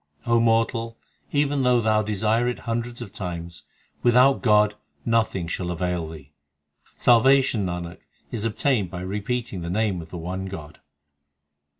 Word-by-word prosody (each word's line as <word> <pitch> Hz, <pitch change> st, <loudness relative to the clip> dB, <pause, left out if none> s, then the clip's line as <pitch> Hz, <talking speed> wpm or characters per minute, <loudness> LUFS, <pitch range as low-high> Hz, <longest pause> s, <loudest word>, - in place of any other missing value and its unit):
O 115 Hz, 0 st, +3 dB
mortal, 115 Hz, 0 st, +1 dB, 0.3 s
even 145 Hz, -1 st, +1 dB
though 125 Hz, -1 st, +4 dB
thou 110 Hz, -1 st, +2 dB
desire 110 Hz, +3 st, +1 dB
it 125 Hz, -, -1 dB
hundreds 120 Hz, +1 st, -3 dB
of 100 Hz, -, -12 dB
times, 85 Hz, -3 st, -6 dB, 0.4 s
Without 125 Hz, +3 st, +5 dB
God 105 Hz, -3 st, +4 dB, 0.3 s
nothing 115 Hz, -6 st, +1 dB
shall 90 Hz, +1 st, -3 dB
avail 90 Hz, -1 st, -2 dB
thee. 75 Hz, -3 st, -11 dB, 0.6 s
Salvation, 125 Hz, -3 st, +4 dB
Nanak, 85 Hz, -1 st, -5 dB, 0.3 s
is 110 Hz, -3 st, -3 dB
obtained 115 Hz, -3 st, 0 dB
by 90 Hz, +1 st, -6 dB
repeating 105 Hz, +2 st, -3 dB
the 85 Hz, -, -4 dB
name 100 Hz, -2 st, 0 dB
of 80 Hz, -, -11 dB
the 90 Hz, -, -7 dB
one 90 Hz, +3 st, -4 dB
God. 80 Hz, -6 st, -9 dB
105 Hz, 140 wpm, -24 LUFS, 90-120 Hz, 0.6 s, Without